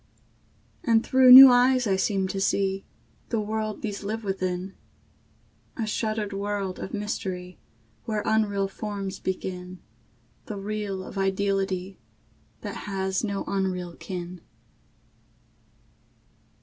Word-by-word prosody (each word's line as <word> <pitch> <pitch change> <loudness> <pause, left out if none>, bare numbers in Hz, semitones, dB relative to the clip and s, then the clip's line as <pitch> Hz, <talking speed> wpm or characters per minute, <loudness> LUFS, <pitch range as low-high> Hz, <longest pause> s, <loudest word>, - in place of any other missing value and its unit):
And 230 -2 +3
through 260 -1 +6
new 260 +1 +13
eyes 250 +1 +4
I 195 -3 +2
seem 190 0 0
to 195 - -3
see 195 0 0 0.4
The 230 - 0
world 215 0 -3
these 205 -2 -4
live 220 +3 -4
within, 185 -1 -3 1.0
A 225 - -1
shuttered 215 -1 -2
world 200 -1 -3
of - - -6
mystery, 185 -3 -5 0.5
Where 215 -2 -2
unreal 205 -3 +1
forms 195 -1 -5
begin 185 -1 -5 0.7
The 210 - -5
real 200 -1 -4
of 195 - -7
ideality 195 -1 -1 0.6
That - - -7
has 190 0 -1
no 200 -2 -2
unreal 185 -3 -2
kin. 180 -2 -7
200 Hz, 110 wpm, -26 LUFS, 190-215 Hz, 1.0 s, new